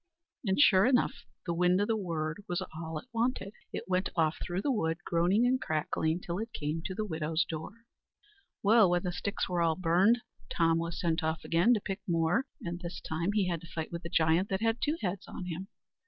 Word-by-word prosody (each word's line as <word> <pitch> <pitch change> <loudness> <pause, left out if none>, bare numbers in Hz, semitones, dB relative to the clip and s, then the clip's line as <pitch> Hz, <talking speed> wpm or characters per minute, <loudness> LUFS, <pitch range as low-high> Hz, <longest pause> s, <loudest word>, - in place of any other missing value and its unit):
And 190 0 +1
sure 195 -7 +6
enough 255 -1 +3 0.3
the 170 - -1
wind 180 +2 +3
o' 205 - +2
the 225 - +1
word 165 -3 -3
was 175 -3 -1
all 160 0 -5
it - - -8
wanted. 230 -4 -1 0.2
It - - -5
went 185 +1 +1
off 160 -2 +2
through 180 +2 -3
the 285 - +2
wood, 165 -9 0
groaning 180 +7 +3
and 255 +1 +2
crackling, 160 +2 -1
till 175 +1 -3
it 225 +1 -5
came 150 +2 -2
to 185 - -3
the 215 - -2
widow's 160 -2 -1
door. 175 +9 -7 0.8
Well, 215 -1 +6
when 175 0 +1
the 180 - -1
sticks 200 +3 -2
were 180 -2 0
all 165 -1 +3
burned, 185 +7 +3 0.3
Tom 165 -1 +2
was 170 0 -3
sent 165 -1 0
off 160 0 -2
again 180 +9 +4
to - - 0
pick 195 0 -4
more; 175 +8 +1 0.2
and 175 0 -4
this 175 0 -6
time 170 +5 -2
he 205 -3 +2
had 170 -3 -2
to 170 - -11
fight 160 -1 -5
with 170 +1 -5
a 170 - -5
giant 165 +2 +2
that 190 +1 -1
had 225 +1 +1
two 300 +2 +1
heads 185 0 -2
on 185 - -6
him. 180 +2 -5
175 Hz, 220 wpm, -31 LUFS, 165-205 Hz, 0.8 s, sure